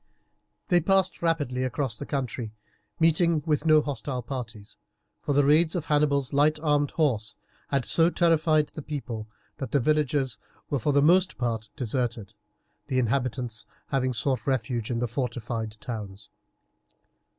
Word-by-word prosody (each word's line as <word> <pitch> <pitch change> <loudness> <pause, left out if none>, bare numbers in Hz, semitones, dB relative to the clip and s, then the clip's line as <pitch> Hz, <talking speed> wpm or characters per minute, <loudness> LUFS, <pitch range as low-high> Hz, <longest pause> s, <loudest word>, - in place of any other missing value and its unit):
They 175 -1 +5
passed 190 +1 +1
rapidly 145 -7 0
across 130 -2 -1
the - - -7
country, 125 -5 -3 0.4
meeting 165 -1 +3
with 155 0 0
no 155 -1 +6
hostile 130 -2 -4
parties, 110 -5 -7 0.4
for 145 - -1
the 145 0 +4
raids 160 +4 +4
of 170 -3 -2
Hannibal's 145 -3 +1
light 150 +2 +3
armed 145 -2 +2
horse 115 -9 0 0.3
had 140 -3 0
so 165 0 +4
terrified 160 -3 +2
the 155 - -8
people 115 -7 -5 0.3
that 135 - -5
the 140 - +4
villages 140 -4 +1 0.3
were 140 - +1
for 145 - +1
the 140 0 +3
most 180 +4 +4
part 115 -3 -2
deserted, 120 -5 -2 0.5
the 130 -3 -1
inhabitants 125 -2 -1 0.2
having 130 -2 +1
sought 125 +1 -1
refuge 120 -3 -1
in 120 - -1
the 120 +1 0
fortified 115 -3 -4
towns. 105 -4 -7
135 Hz, 145 wpm, -26 LUFS, 115-150 Hz, 0.5 s, no